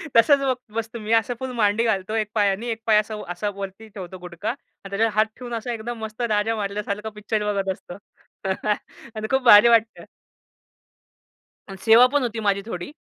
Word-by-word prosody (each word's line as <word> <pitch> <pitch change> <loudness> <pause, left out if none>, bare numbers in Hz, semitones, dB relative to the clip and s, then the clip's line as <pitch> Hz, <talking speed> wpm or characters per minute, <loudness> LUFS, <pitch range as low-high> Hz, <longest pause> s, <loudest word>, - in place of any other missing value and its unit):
तसंच 275 +5 +6
बग 265 -2 +1 0.2
बसतो 225 +1 -4
मी 215 +1 -5
असं 225 +2 +2
फुल 260 -1 -4
मांडी 215 0 +2
घालतो 210 -2 -1
एक 215 -1 -1
पायाने 205 +2 +1
एक 225 - -5
पाय 215 -2 +5
असा 215 +1 -4
व 210 - -7
असा 175 +4 -2
वरती 200 +2 -7
ठेवतो 190 -3 -8
गुढगा 180 +4 -5
आणि 230 -5 -9
त्याच्यावर 215 +3 +1
हात 215 0 +4
ठेवून 245 -1 -8
असा 230 +1 -3
एकदम 230 +1 -5
मस्त 220 +2 -6
राजा 215 +1 +1
मारल्यासारखं 210 +1 -3
पिक्चर 210 0 -2
बघत 195 -1 -1
असतो 175 0 -12 1.2
आणि 215 0 -4
खूप 265 0 +3
भारी 220 -2 +9
वाटतं. 230 -1 +3 1.7
आणि 195 - -8
सेवा 225 +2 +8
पण 290 - +3
होती 230 -2 -3
माझी 200 -2 +1
थोडी. 180 0 -6
215 Hz, 185 wpm, -23 LUFS, 200-230 Hz, 1.7 s, भारी